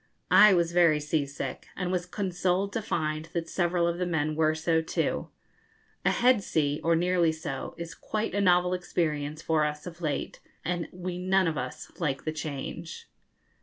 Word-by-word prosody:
I 210 0 +9
was 170 -1 +2
very 170 -3 +4
sea 150 -1 0
sick, 140 - -6
and 180 -1 -2
was 180 -1 -1
consoled 185 +1 -1
to 225 - -1
find 155 -6 -2
that 170 -1 -2
several 175 -1 +1
of 170 0 -1
the 180 - 0
men 155 -3 0
were 155 0 +2
so 160 0 +1
too. 160 - -1 0.7
A - - +4
head 245 -3 +4
sea 150 -5 0
or 165 0 +3
nearly 175 -1 +3
so 155 -4 -5
is 170 -1 -6
quite 215 +1 -3
a 200 - +1
novel 180 -1 +4
experience 155 -4 -2
for 160 -1 +2
us 150 0 -2
of 175 -1 -9
late, 155 -4 -2 0.3
and 175 0 -1
we 180 0 -5
none 185 0 +3
of 160 - 0
us 130 -2 -5
like 140 -5 -1
the 155 - -1
change. 155 +2 -6
170 Hz, 180 wpm, -28 LUFS, 155-180 Hz, 0.7 s, I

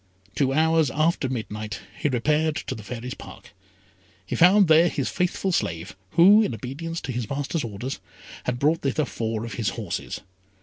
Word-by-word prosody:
Two 135 -2 +1
hours 160 0 +3
after 155 -2 +1
midnight 105 -4 -5
he 145 - -1
repaired 150 +5 +1
to 135 - -4
the 110 - -8
Fairy's 125 +3 -6
Park; - - -12 0.7
he - - -3
found 190 +3 +6
there 160 +2 +6
his 140 -5 -2
faithful 180 +1 0
slave, 85 - -2 0.2
who, 200 +6 +7
in 205 - 0
obedience 150 +9 -5
to - - -4
his 120 -3 -3
master's 145 +3 -2
orders, 115 +4 -5 0.5
had 125 -1 -1
brought 150 +5 +2
thither 140 +2 0
four 115 -3 -3
of 115 - -6
his 110 -5 -1
horses. 100 -2 -5
135 Hz, 170 wpm, -25 LUFS, 115-160 Hz, 0.7 s, who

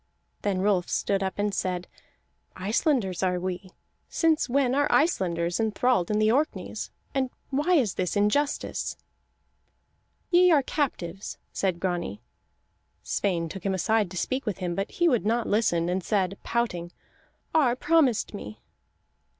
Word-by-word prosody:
Then 195 -2 0
Rolf 195 -4 +2
stood 195 -1 0
up 190 -1 -2
and 205 0 0
said: 180 -2 -2 0.7
"Icelanders 210 - 0
are 180 -1 +1
we. 185 +1 -4 0.4
Since 325 -4 +2
when 260 -1 +2
are 290 +2 +2
Icelanders 175 - +1
enthralled 220 -3 +1
in 210 - +1
the 215 0 +4
Orkneys, 290 +6 -1 0.2
and 265 -2 0 0.2
why 300 +7 +2
is 235 - +2
this 180 -2 -2
injustice?" 210 +9 0 1.3
"Ye 360 0 +6
are 290 -4 +5
captives," 195 - -3 0.2
said 185 -3 -1
Grani. 175 - -2 0.8
Sweyn 175 -4 -1
took 180 +3 -8
him 195 -1 0
aside 210 +2 +1
to 185 - -7
speak 260 +6 -2
with 205 - -1
him; 180 -2 -2
but 195 +3 -2
he 345 - +1
would 245 -8 +2
not 230 +3 +1
listen, 175 -6 +1
and 180 +1 -1
said, 195 -2 0
pouting: 180 -8 -1 0.6
"Ar 275 -7 +4
promised 280 -7 +2
me." 105 - -8
205 Hz, 140 wpm, -27 LUFS, 185-260 Hz, 1.3 s, Ye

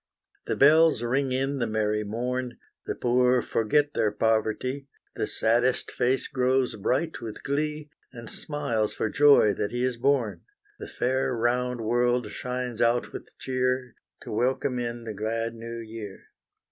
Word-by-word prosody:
The - - 0
bells 155 -2 +5
ring 130 +3 0
in 135 +2 -1
the 120 - 0
merry 105 -1 0
morn, 125 +3 -3 0.3
The - - -2
poor 125 0 +2
forget 145 +7 +1
their 105 - +1
poverty, 115 +5 0 0.3
The - - -2
saddest 120 +3 +1
face 125 +2 0
grows 130 -1 +1
bright 130 +9 -1
with 110 -2 -7
glee, 150 +1 -2 0.2
And 115 -3 -10
smiles 130 -9 -2
for 110 - -1
joy 145 -8 +6
that 100 - -2
he 120 +2 -2
is 130 -2 0
born; 125 -4 +1 0.4
The - - -7
fair 130 0 0
round 125 +1 0
world 120 0 +1
shines 125 -1 -4
out 120 +1 +2
with - - -10
cheer, 130 -1 -1 0.3
To - - -8
welcome 125 +2 0
in 120 -1 -4
the 110 -1 -5
glad 115 +2 -2
New 115 0 -7
Year. 110 -3 -8
125 Hz, 150 wpm, -26 LUFS, 115-130 Hz, 0.4 s, joy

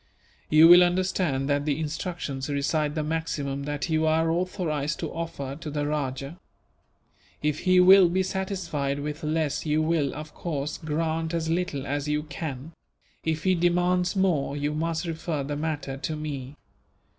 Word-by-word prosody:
"You 155 +2 +8
will 175 +1 +10
understand 175 -6 0
that 145 0 +1
the 145 0 0
instructions 155 -3 -4
recite 145 +1 0
the 155 - -1
maximum 145 -3 -2
that 145 +1 -3
you 160 -1 +1
are 160 +1 +2
authorized 165 -4 -1
to - - -4
offer 140 -5 -5
to 160 -1 -7
the 145 0 -2
rajah. 145 +2 -3 1.0
If 150 -1 0
he 185 -1 +4
will 185 0 +8
be 190 +2 +1
satisfied 180 -7 -2
with 150 +2 -5
less 155 -1 0
you 155 0 +1
will, 155 -4 0
of 155 +1 -8
course, 150 -4 -4
grant 160 +1 -1
as 160 -1 -1
little 165 -6 -1
as 145 +1 -2
you 150 0 0
can; 150 -1 -6 0.5
if 160 -1 -1
he 185 - +3
demands 180 +1 +2
more, 165 -7 +1
you 145 +1 -1
must 165 +2 -1
refer 165 -3 -3
the 145 +2 -3
matter 145 -3 -3
to 155 +3 -3
me. 145 -3 -5
155 Hz, 160 wpm, -26 LUFS, 145-170 Hz, 1.0 s, will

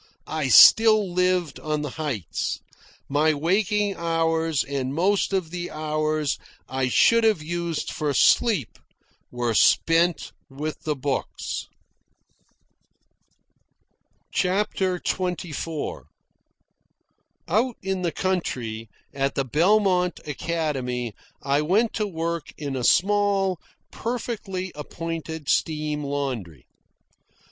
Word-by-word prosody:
I 155 -3 -2
still 215 - +7
lived 180 -2 +1
on 150 -1 -2
the 145 - -4
heights. 140 - -3 0.5
My 150 +2 +2
waking 200 +5 +1
hours, 165 -2 0
and 135 -1 -3
most 195 +5 +2
of 185 -5 -1
the 175 0 -4
hours 155 -1 -1 0.3
I 130 -1 -1
should 230 - +4
have 215 -8 +2
used 170 0 -3
for 150 -1 -1
sleep, 205 - +3 0.5
were 120 -1 -1
spent 165 +8 +3 0.2
with 150 +3 -6
the 150 -1 0
books. 135 0 -3 2.6
CHAPTER 190 -1 0
XXIV 170 -4 -3 1.4
Out 230 +7 +1
in 190 -1 -2
the 175 -2 0
country, 120 - -2 0.2
at 135 0 -1
the 135 - 0
Belmont 180 - +2
Academy, 135 -6 -2 0.3
I 140 +1 +2
went 205 +9 +2
to 215 -2 -1
work 170 -3 -3
in 140 -3 -4
a 125 - -3
small, 195 +1 +2 0.3
perfectly 210 -6 -4
appointed 160 0 -6
steam 150 0 0
laundry. 130 - -4
165 Hz, 100 wpm, -24 LUFS, 145-185 Hz, 2.6 s, still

